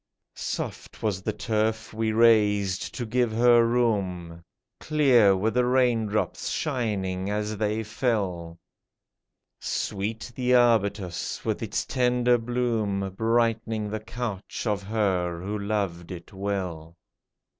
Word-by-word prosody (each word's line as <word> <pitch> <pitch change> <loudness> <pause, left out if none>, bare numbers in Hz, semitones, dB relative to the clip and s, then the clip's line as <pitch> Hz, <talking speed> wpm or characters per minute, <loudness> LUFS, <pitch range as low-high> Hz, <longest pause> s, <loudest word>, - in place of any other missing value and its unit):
Soft - - -5
was 100 -4 0
the 110 - -1
turf 110 +2 -1
we 110 0 0
raised 105 -4 +3
to 120 - -3
give 120 +1 +1
her 120 +1 +5
room; 95 -8 -1 0.4
Clear 125 -10 +4
were 110 +4 +1
the 125 +3 +2
rain 125 -3 +2
drops, 105 +1 -2
shining 100 -9 -2
as 105 +1 -2
they 110 +1 -1
fell; 95 -8 -2 1.0
Sweet 110 +4 -3
the 125 0 +2
arbutus, 100 -7 +1
with - - -1
its - - -2
tender 125 -1 +2
bloom 115 -5 -1
Brightening 115 -1 0
the 110 - -2
couch 110 -2 -5
of 105 -3 0
her 95 -5 -1
who 100 +4 -4
loved 100 -5 -2
it 85 0 -9
well. 90 -5 -4
110 Hz, 120 wpm, -26 LUFS, 95-115 Hz, 1.0 s, her